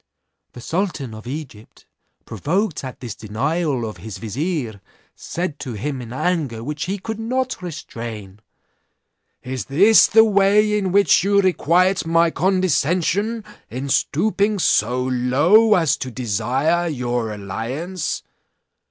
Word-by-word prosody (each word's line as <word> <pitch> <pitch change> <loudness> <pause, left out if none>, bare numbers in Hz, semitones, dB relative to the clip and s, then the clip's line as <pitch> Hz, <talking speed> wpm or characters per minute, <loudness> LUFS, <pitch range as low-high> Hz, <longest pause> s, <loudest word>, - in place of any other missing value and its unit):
"The 125 - -10
sultan 160 - -3
of 110 +2 -10
Egypt, 130 -6 -9 0.4
provoked 165 - -2
at 130 -1 -8
this 120 -5 -5
denial 130 +4 -2
of 110 - -8
his 110 -3 -8
vizier 115 - -3 0.3
said 170 -4 -5
to 130 -4 -5
him 130 +5 -4
in 120 -1 -9
anger 135 -5 -1
which 150 +4 -4
he 195 +3 -2
could 220 +3 -6
not 255 +1 -2
restrain: 115 - -7 1.0
'Is 130 -5 -4
this 195 - +6
the 220 +1 +6
way 210 0 +3
in 195 -3 0
which 200 -2 +4
you 200 +1 +3
requite 185 0 +2
my 165 0 +3
condescension 185 +4 +1 0.3
in 130 +4 -5
stooping 205 +9 +1
so 125 - +2
low 145 - +4
as 165 -5 +2
to 130 - -5
desire 130 - 0
your 120 -6 -2
alliance? 120 - -4
150 Hz, 125 wpm, -21 LUFS, 120-190 Hz, 1.0 s, this